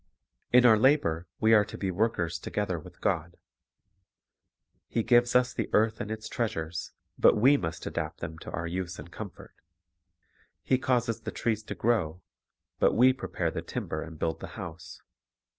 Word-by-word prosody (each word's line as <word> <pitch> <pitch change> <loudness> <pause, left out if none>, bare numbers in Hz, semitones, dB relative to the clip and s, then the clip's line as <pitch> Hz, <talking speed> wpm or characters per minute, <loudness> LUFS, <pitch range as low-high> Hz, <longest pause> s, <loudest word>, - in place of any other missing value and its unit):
In 125 0 +6
our 110 -3 +7
labor 90 - +3
we 110 0 +4
are 105 -2 +7
to 105 - -9
be 95 -2 -2
workers 85 -5 0
together 95 -1 -2
with - - -14
God. 85 +1 -1 1.5
He 115 - -1
gives 120 +1 +4
us 125 0 +4
the - - -3
earth 110 0 +2
and 105 - -4
its 110 0 -5
treasures; 85 -8 -3 0.3
but - - +6
we 130 +7 +6
must 80 - -3
adapt - - -4
them 80 +1 -6
to - - -9
our 80 - -4
use 90 +1 -4
and 80 +3 -10
comfort. 100 -1 -9 1.1
He 130 - +2
causes 120 -3 0
the - - -5
trees 110 -2 -1
to - - -5
grow; 90 -8 0 0.6
but - - +4
we 130 +3 +6
prepare 130 - -3
the - - -4
timber 80 - -4
and 80 -1 -8
build 80 -1 -2
the - - -7
house. 85 +1 -8
105 Hz, 170 wpm, -28 LUFS, 85-120 Hz, 1.5 s, our